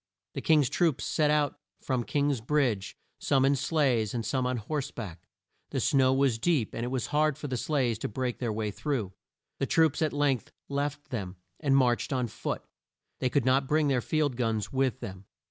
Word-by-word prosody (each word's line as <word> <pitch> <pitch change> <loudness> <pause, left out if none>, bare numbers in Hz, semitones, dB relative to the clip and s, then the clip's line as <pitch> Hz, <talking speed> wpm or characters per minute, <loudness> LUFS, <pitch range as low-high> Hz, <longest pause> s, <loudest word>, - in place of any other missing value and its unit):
The 135 - -4
King's 150 -3 +4
troops 165 -2 +1
set 150 -1 +2
out 150 -2 +1 0.2
from 130 -3 -1
King's 140 -2 0
Bridge, 120 -7 0 0.2
some 135 -2 +3
in 140 +1 +4
sleighs 130 -8 +1
and 115 -2 -2
some 130 +2 0
on 125 0 -1
horse 140 +5 -3
back. 95 -5 -8 0.4
The - - -2
snow 130 -2 +3
was 135 -4 +2
deep, 145 -5 +1
and 115 - -3
it - - -1
was 125 -2 -1
hard 150 -1 +3
for 150 - -5
the 130 - -2
sleighs 125 -4 0
to - - -2
break 125 +2 -3
their 120 -3 -1
way 105 -1 -2
through. 110 -5 -2 0.5
The 135 - 0
troops 160 +1 +3
at 155 -2 +2
length 145 -4 0 0.2
left 145 +1 -3
them, 100 -6 -4 0.2
and 135 -2 +3
marched 125 -1 +2
on 130 -2 +1
foot. 110 - -4 0.6
They 130 - +1
could 140 -2 +1
not 130 +1 +3
bring 150 0 +2
their 130 -3 +2
field 145 -2 0
guns 115 -3 -1
with 130 -1 0
them. 95 -4 -7
130 Hz, 195 wpm, -29 LUFS, 115-145 Hz, 0.6 s, King's